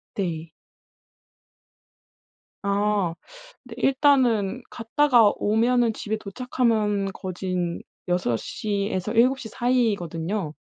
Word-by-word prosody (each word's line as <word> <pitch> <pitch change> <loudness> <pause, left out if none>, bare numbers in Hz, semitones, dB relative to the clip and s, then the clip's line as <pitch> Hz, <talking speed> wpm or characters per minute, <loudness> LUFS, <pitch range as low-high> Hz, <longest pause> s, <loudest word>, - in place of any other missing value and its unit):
네. 165 -4 -3 2.1
아 200 -3 +1 0.5
근데 230 - -9
일단은 255 -5 +3
갔다가 235 -2 +3
오면은 230 +3 +2
집에 220 0 -3
도착하면 215 -2 0
거진 185 -2 -3 0.3
6:00 180 - -1
에서 190 0 -2
7:00 250 +1 +2
사이거든요. 200 -8 -1
210 Hz, 155 characters per minute, -24 LUFS, 185-240 Hz, 2.1 s, 일단은